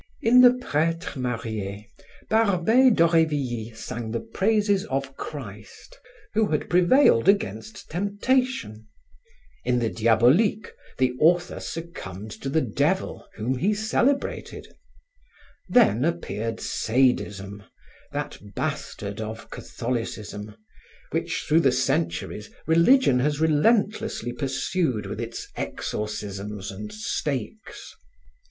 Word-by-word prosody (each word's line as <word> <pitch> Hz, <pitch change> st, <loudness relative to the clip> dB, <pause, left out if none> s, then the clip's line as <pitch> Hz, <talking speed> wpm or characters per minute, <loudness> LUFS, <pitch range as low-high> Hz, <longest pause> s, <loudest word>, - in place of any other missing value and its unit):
In 245 Hz, +3 st, +7 dB
the 250 Hz, 0 st, +7 dB
Pretre 165 Hz, -5 st, -1 dB
marie, 110 Hz, -4 st, -4 dB, 0.4 s
Barbey 220 Hz, +4 st, +4 dB
d'Aurevilly 150 Hz, -, +2 dB
sang 115 Hz, 0 st, -6 dB
the 115 Hz, +1 st, -2 dB
praises 205 Hz, -, +1 dB
of 135 Hz, 0 st, -3 dB
Christ, 105 Hz, -9 st, -9 dB, 0.3 s
who 215 Hz, 0 st, +2 dB
had 150 Hz, -3 st, -2 dB
prevailed 180 Hz, -, +5 dB
against 210 Hz, +1 st, -1 dB
temptations; 205 Hz, -, 0 dB, 0.8 s
in 125 Hz, 0 st, +1 dB
the 115 Hz, -2 st, 0 dB
Diaboliques, 125 Hz, -, +3 dB, 0.3 s
the 130 Hz, -1 st, +2 dB
author 175 Hz, +3 st, +3 dB
succumbed 110 Hz, -, -7 dB
to 135 Hz, -, -3 dB
the 160 Hz, +3 st, +2 dB
Devil, 145 Hz, -, -1 dB
whom 125 Hz, +4 st, -2 dB
he 205 Hz, +7 st, +2 dB
celebrated; 240 Hz, +6 st, -1 dB, 1.0 s
then 210 Hz, -, +4 dB
appeared 115 Hz, -9 st, -2 dB
sadism, 105 Hz, -5 st, 0 dB, 0.5 s
that -, -, -4 dB, 0.2 s
bastard 100 Hz, +2 st, -4 dB
of 110 Hz, +1 st, -7 dB
Catholicism, 110 Hz, -3 st, -5 dB, 0.6 s
which -, -, -2 dB
through 160 Hz, -, +5 dB
the 135 Hz, -6 st, +4 dB
centuries 130 Hz, -5 st, -1 dB, 0.2 s
religion 170 Hz, -, +5 dB
has 145 Hz, +3 st, 0 dB
relentlessly 200 Hz, -, +1 dB
pursued 135 Hz, -, -1 dB
with -, -, -5 dB
its -, -, -6 dB
exorcisms 105 Hz, -1 st, -4 dB
and 105 Hz, +2 st, -7 dB
stakes. 130 Hz, -, -4 dB
135 Hz, 100 wpm, -25 LUFS, -, 1.0 s, In